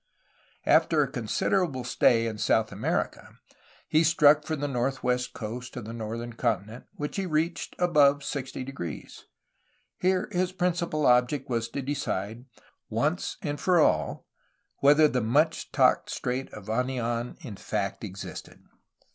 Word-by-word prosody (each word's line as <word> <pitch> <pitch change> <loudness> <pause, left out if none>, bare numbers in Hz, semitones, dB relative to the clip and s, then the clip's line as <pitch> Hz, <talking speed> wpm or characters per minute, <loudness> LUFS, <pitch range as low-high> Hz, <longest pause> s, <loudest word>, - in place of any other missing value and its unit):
After - - +4
a - - -2
considerable 160 -10 0
stay 120 -1 +3
in 110 -2 -4
South 110 +1 +2
America, - - -3 0.5
he 155 +2 +3
struck 150 -2 +5
for 160 - -1
the 145 -1 -2
northwest 125 -1 -1
coast 120 +4 -6
of 120 - -6
the 115 - -7
northern 115 +1 -5
continent, 115 -1 -2
which 150 +5 -4
he 195 -1 -1
reached 160 +1 -1
above 145 -5 +4
60°. 130 - -6 0.8
Here 185 0 +1
his 185 0 0
principal 170 -4 0
object 125 +2 +3
was 115 -1 -1
to 140 +3 -4
decide, 120 -4 -3 0.4
once 145 +11 -1 0.2
for 180 +3 +3
all, - - +1 0.5
whether 150 +2 +6
the 125 -3 0
much 150 +9 +1
talked - - +3
of - - -3
Strait 125 +2 -3
of 105 -2 -10
Anian 120 0 -2
in 110 -6 -7
fact 100 +1 -3
existed. 95 -2 -8
130 Hz, 135 wpm, -27 LUFS, 115-155 Hz, 0.8 s, whether